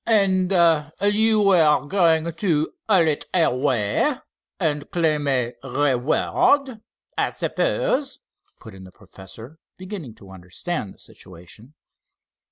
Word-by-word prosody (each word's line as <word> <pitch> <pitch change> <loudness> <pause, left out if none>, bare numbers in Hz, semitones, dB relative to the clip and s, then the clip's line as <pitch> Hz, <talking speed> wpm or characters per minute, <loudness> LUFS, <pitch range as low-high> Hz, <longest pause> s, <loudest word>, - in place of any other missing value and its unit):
"And 195 -4 +2 0.5
you 215 +1 +3
were 160 -8 +3
going 165 -2 +2
to 165 -5 -1 0.2
haul 180 -6 +4
it 150 -2 -2
away 125 - +1 0.5
and 150 -2 -2
claim 155 -4 0
a 125 -3 0
reward, 155 - 0 0.3
I - - 0
suppose," - - -1 0.4
put 110 - -13
in 95 0 -13
the 95 - -13
professor, 100 - -13 0.2
beginning 185 - -8
to 95 -1 -16
understand 95 - -6
the - - -28
situation. 95 - -15
155 Hz, 110 wpm, -22 LUFS, 120-195 Hz, 0.5 s, haul